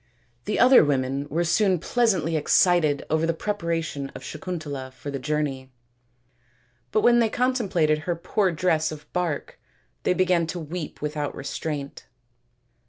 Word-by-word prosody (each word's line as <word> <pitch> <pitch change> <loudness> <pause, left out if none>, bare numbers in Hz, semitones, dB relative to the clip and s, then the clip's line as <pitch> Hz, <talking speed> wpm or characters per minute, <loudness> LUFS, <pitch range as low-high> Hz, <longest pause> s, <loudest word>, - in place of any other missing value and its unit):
The 210 - -1
other 255 +1 +7
women 140 0 -1
were 165 +4 0
soon 185 +2 +2
pleasantly 180 -4 +1
excited 155 -1 +3
over 160 +1 +2
the 165 - 0
preparation 165 -8 -3
of - - -8
Sakuntala 155 -5 -5
for 140 +2 -8
the 135 - -4
journey, 135 -2 -2 1.2
but 215 - +2
when 240 +1 +5
they 230 -2 +3
contemplated 205 -12 +1
her 170 +2 -2
poor 190 +3 0
dress 160 -2 +1
of 150 -1 -9
bark 175 -5 -2 0.4
they 180 - +1
began 180 -3 +2
to 175 +2 -4
weep 160 -1 -6
without 150 -1 -3
restraint. 140 0 -5
160 Hz, 140 wpm, -25 LUFS, 145-180 Hz, 1.2 s, other